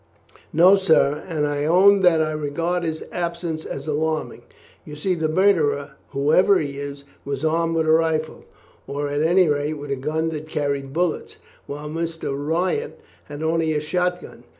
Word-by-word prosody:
"No, 180 +5 +6
sir; 160 -6 +2
and 155 -4 -1
I 145 0 -1
own 195 +5 +5
that 165 -3 +4
I 155 - -2
regard 155 +4 -2
his 160 -1 -3
absence 170 -2 -4
as 140 - -6
alarming. 155 +1 -2 0.4
You 150 - -9
see 180 +5 -1
the 160 -3 -1
murderer, 155 -6 +2 0.2
whoever 155 +8 +3
he 140 -2 -4
is, 140 0 -7 0.2
was 140 +2 -3
armed 165 +1 +1
with 160 -1 +1
a 155 - +3
rifle, 160 -1 0 0.4
or 145 +1 -3
at 145 +1 -1
any 175 +3 +4
rate 145 +1 0
with 145 -1 -7
a - - +1
gun 155 +4 -2
that 155 -1 -6
carried 140 -3 -2
bullets, 170 +2 -2 0.3
while 145 +1 -6
Mr. 165 -1 -4
Wyatt 170 - -2 0.3
had 145 +1 -7
only 160 0 +1
a 150 - 0
shot 180 +3 -1
gun. - - -13
155 Hz, 175 wpm, -22 LUFS, 145-170 Hz, 0.4 s, No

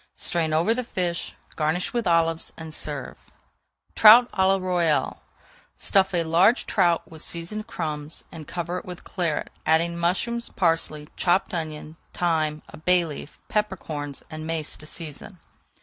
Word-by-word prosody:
Strain 165 -2 0
over 165 +8 +3
the 250 +2 -2
fish, 180 -7 -3 0.2
garnish 160 +3 -1
with 235 -4 -1
olives, 165 -1 +2
and 160 -1 -8
serve. 145 -4 -5 0.7
TROUT 230 +3 +8
À - - -9
LA 195 0 +4
ROYALE 175 -4 0 0.6
Stuff 195 -2 +2
a 170 - +2
large 175 +9 +4
trout 170 -1 +2
with 160 -1 -5
seasoned 210 +6 -3
crumbs, 150 -5 -3
and 155 -3 -9
cover 175 +1 -3
it - - -14
with 180 -1 -8
Claret, 170 -5 -2
adding 170 +2 +2
mushrooms, 190 +8 -1
parsley, 165 -3 +1
chopped 180 +2 +2
onion, 155 -1 -4 0.2
thyme, 155 -3 0
a - - -11
bay 180 +2 +3
leaf, 150 -1 -8
pepper 210 -2 0
corns, 145 -4 -6
and 155 0 -6
mace 160 -2 -3
to 150 - -11
season. 165 +4 -8
170 Hz, 150 wpm, -25 LUFS, 155-185 Hz, 0.7 s, TROUT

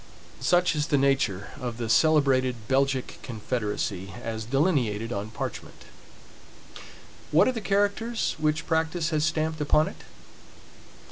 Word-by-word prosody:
Such 175 -1 +2
is 150 +1 0
the 145 - +2
nature 135 -8 +1
of 120 -2 -4
the 120 -1 -3
celebrated 130 -5 +3
Belgic 135 0 0
confederacy, 105 -5 -3
as 110 -1 -4
delineated 120 - 0
on 100 +2 -4
parchment. 110 - -7 1.4
What 155 - +5
are - - +3
the 225 - -4
characters 205 +4 0
which 155 +1 0
practice 160 0 0
has 155 -1 +1
stamped 155 0 -1
upon 150 +1 +3
it? - - -13
140 Hz, 125 wpm, -26 LUFS, 115-160 Hz, 1.4 s, What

